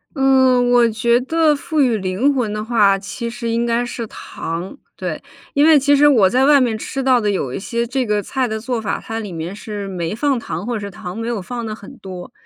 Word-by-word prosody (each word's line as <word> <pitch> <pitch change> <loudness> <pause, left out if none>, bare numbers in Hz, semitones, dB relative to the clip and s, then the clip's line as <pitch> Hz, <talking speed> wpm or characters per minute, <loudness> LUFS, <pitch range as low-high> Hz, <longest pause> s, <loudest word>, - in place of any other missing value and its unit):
嗯， 260 -2 +4
我 240 -1 +5
觉 235 +2 +2
得 310 +2 +2
赋 310 +2 -3
予 245 -4 +3
灵 195 +9 +1
魂 245 -6 -1
的 210 0 -4
话， 205 -4 +3
其 235 +4 -5
实 235 0 -5
应 230 +1 0
该 235 +1 0
是 235 -1 -5
糖。 170 +3 -6 0.2
对， - - -4 0.3
因 285 - +3
为 320 -1 +7
其 285 +1 +3
实 290 +1 +5
我 230 -10 +5
在 255 +6 +3
外 290 0 +6
面 240 -4 +1
吃 270 +5 -4
到 255 -2 +4
的 210 - 0
有 145 -11 -2
一 - - -3
些 235 +4 -2
这 255 +1 -1
个 210 -1 +1
菜 255 +5 -1
的 220 -1 -3
做 235 0 -3
法， 210 - -2
它 225 0 -5
里 210 -4 -6
面 170 +4 -5
是 210 -1 -6
没 175 -1 -3
放 275 +2 +1
糖， 220 - -5
或 240 - -2
者 - - -2
是 200 -1 -6
糖 180 0 -8
没 225 0 -4
有 235 -3 -2
放 235 +5 -5
得 215 -1 -4
很 205 - -12
多。 185 -2 -9
235 Hz, 260 characters per minute, -19 LUFS, 205-255 Hz, 0.3 s, 为